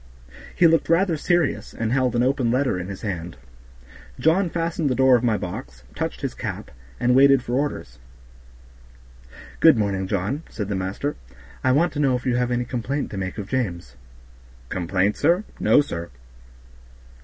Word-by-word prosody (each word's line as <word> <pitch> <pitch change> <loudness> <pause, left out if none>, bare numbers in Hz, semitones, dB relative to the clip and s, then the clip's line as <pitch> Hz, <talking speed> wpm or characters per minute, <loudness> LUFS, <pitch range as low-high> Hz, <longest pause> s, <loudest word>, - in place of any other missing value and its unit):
He 175 - +4
looked 165 0 +3
rather 170 +1 +3
serious, 175 0 0
and 115 0 -2
held 130 -2 +1
an 120 - +2
open 130 -2 +1
letter 125 -5 +1
in 90 - -5
his 100 -1 -8
hand. 90 -6 -4 0.8
John 170 +4 +3
fastened 165 -2 -1
the 130 - 0
door 130 0 +5
of 120 - +1
my 115 -3 +2
box, 65 -9 -7
touched - - -4
his - - -3
cap, - - -6 0.3
and 125 +1 +2
waited 135 0 +5
for 120 - -5
orders. 145 +3 -3 1.6
"Good - - +6
morning, 100 -3 -1
John," 100 - -2
said 105 -2 -5
the 100 - -1
master. 95 +10 -3 0.5
"I 130 - +3
want 160 +7 +2
to 145 - -4
know 135 -3 +3
if 125 - -5
you 125 -2 +1
have 125 0 0
any 120 0 -1
complaint 125 +4 -3
to 100 - -5
make 95 +1 -4
of 100 -2 -5
James." 85 - -3 0.7
"Complaint, 95 +3 0
sir? 170 +7 +2 0.2
No, - - +5
sir." 85 -12 -5
125 Hz, 170 wpm, -23 LUFS, 100-145 Hz, 1.6 s, Good